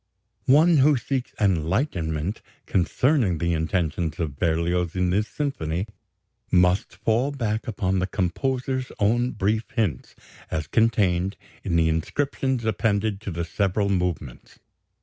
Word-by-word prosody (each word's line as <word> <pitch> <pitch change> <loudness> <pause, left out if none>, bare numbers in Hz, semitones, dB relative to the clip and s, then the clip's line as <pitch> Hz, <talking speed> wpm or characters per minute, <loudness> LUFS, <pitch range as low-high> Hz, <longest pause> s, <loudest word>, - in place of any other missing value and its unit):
One 155 +5 +6
who 145 +1 +5
seeks 130 +1 -3
enlightenment 90 - 0 0.2
concerning 110 - +2
the 85 +1 0
intentions 80 -1 -1
of 75 -5 -2
Berlioz 85 +1 0
in 90 -1 +1
this 105 +3 +1
symphony 95 - -2 0.6
must 90 +1 +2
fall 115 +5 +1
back 115 -6 -2
upon 95 -3 0
the 95 - 0
composer's 130 +8 -1
own 120 +4 +2
brief 110 +2 0
hints 100 - -1 0.3
as 80 -1 -2
contained 95 -2 +1 0.3
in 85 - -1
the 80 -1 +4
inscriptions 130 - -1
appended 105 -1 0
to 105 - -5
the 85 -1 -3
several 100 +3 0
movements. 90 -9 -3
95 Hz, 125 wpm, -24 LUFS, 85-115 Hz, 0.6 s, One